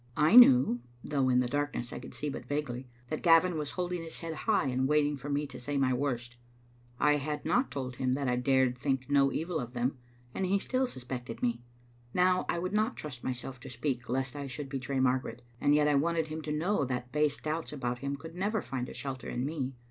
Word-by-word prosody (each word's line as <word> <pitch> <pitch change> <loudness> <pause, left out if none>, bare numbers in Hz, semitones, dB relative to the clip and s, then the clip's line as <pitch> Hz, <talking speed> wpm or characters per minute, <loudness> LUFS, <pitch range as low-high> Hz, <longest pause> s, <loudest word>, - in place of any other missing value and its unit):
I 155 +8 +5
knew, 130 - +8 0.2
though 135 -3 +1
in 125 0 +4
the 125 - 0
darkness 140 -2 -2
I - - -5
could 125 - -10
see 150 - -3
but 135 -3 -5
vaguely, 135 -3 -3 0.2
that 155 - -3
Gavin 170 +1 +5
was 150 -2 -3
holding 180 -1 -2
his 165 -1 -8
head 165 -1 -5
high 210 +1 +1
and 130 0 +1
waiting 150 0 +3
for 140 +1 -7
me 145 +1 0
to 130 -3 -9
say 145 +3 -3
my 130 -2 +3
worst. 125 -2 -2 0.6
I 150 0 +4
had 150 +1 -4
not 250 +2 +2
told 130 -2 -5
him 130 -1 +1
that 140 0 -1
I 125 - +2
dared 130 -1 +2
think 135 0 -1
no 140 -1 +4
evil 165 +1 -2
of 120 0 -6
him, 125 +2 -1 0.3
and 190 - -1
he 195 +2 +3
still 255 +6 0
suspected 125 - -6
me. 120 -1 0 0.5
Now 180 0 +3
I - - +1
would 185 +3 -2
not 215 +3 +1
trust 130 -5 -7
myself 130 0 -4
to - - -9
speak 125 -1 -3
lest 130 +1 -1
I 140 -1 -4
should 135 +1 -6
betray 135 0 -2
Margaret, 130 -1 0 0.2
and 145 - +4
yet 150 0 +4
I 150 - +3
wanted 160 +2 +1
him 155 +1 -4
to 155 - -4
know 165 +3 +1
that 125 -1 -3
base 150 -1 +1
doubts 155 +1 -3
about 125 -4 -3
him 140 +2 -2
could 160 +3 -9
never 205 +5 0
find 125 -2 -4
a - - -9
shelter 135 -2 -5
in 125 +2 -2
me. 135 -3 -3
140 Hz, 230 wpm, -31 LUFS, 125-155 Hz, 0.6 s, knew